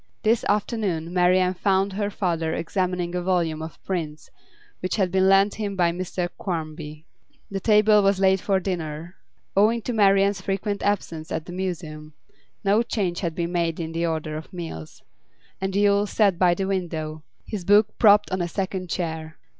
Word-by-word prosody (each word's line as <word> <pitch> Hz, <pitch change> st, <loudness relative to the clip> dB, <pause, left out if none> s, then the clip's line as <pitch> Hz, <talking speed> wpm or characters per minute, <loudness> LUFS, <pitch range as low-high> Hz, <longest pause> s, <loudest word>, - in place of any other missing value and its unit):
This 225 Hz, +1 st, +2 dB
afternoon 200 Hz, -6 st, -1 dB
Marian 180 Hz, 0 st, +3 dB
found 195 Hz, +1 st, +1 dB
her 205 Hz, +1 st, -1 dB
father 165 Hz, -5 st, -1 dB
examining 180 Hz, 0 st, -2 dB
a 180 Hz, -, -1 dB
volume 170 Hz, -4 st, 0 dB
of 160 Hz, 0 st, -7 dB
prints 155 Hz, -5 st, -4 dB, 0.5 s
which 185 Hz, -, -2 dB
had 190 Hz, -4 st, +1 dB
been 190 Hz, +1 st, +3 dB
lent 195 Hz, +1 st, +5 dB
him 205 Hz, -2 st, -4 dB
by 175 Hz, -2 st, +2 dB
Mr 180 Hz, 0 st, -3 dB
Quarmby. 155 Hz, -3 st, -5 dB, 0.5 s
The 195 Hz, -, -2 dB
table 210 Hz, 0 st, +5 dB
was 195 Hz, -1 st, +2 dB
laid 190 Hz, -1 st, +3 dB
for 195 Hz, -2 st, +1 dB
dinner 170 Hz, -2 st, -4 dB, 0.4 s
(owing 220 Hz, +3 st, +3 dB
to 245 Hz, -, -3 dB
Marian's 195 Hz, -2 st, +3 dB
frequent 200 Hz, +1 st, -2 dB
absence 165 Hz, -6 st, -2 dB
at 160 Hz, -, -3 dB
the 175 Hz, -, -8 dB
Museum, 160 Hz, -5 st, -5 dB, 0.5 s
no 205 Hz, +2 st, +3 dB
change 190 Hz, -7 st, -2 dB
had 170 Hz, -4 st, -3 dB
been 170 Hz, 0 st, -2 dB
made 170 Hz, -2 st, -1 dB
in 165 Hz, -1 st, -4 dB
the 165 Hz, +1 st, -1 dB
order 155 Hz, -1 st, -3 dB
of 160 Hz, -, -9 dB
meals), 165 Hz, -, -8 dB, 0.6 s
and 190 Hz, 0 st, -2 dB
Yule 205 Hz, 0 st, +3 dB
sat 200 Hz, -4 st, +2 dB
by 175 Hz, -2 st, +4 dB
the 195 Hz, -, -2 dB
window, 160 Hz, -5 st, -3 dB, 0.2 s
his 205 Hz, -5 st, -5 dB
book 205 Hz, +3 st, +4 dB
propped 210 Hz, -3 st, +5 dB
on 185 Hz, 0 st, -1 dB
a 175 Hz, -, -1 dB
second 185 Hz, 0 st, -3 dB
chair. 160 Hz, -3 st, -4 dB
185 Hz, 170 wpm, -24 LUFS, 165-200 Hz, 0.6 s, lent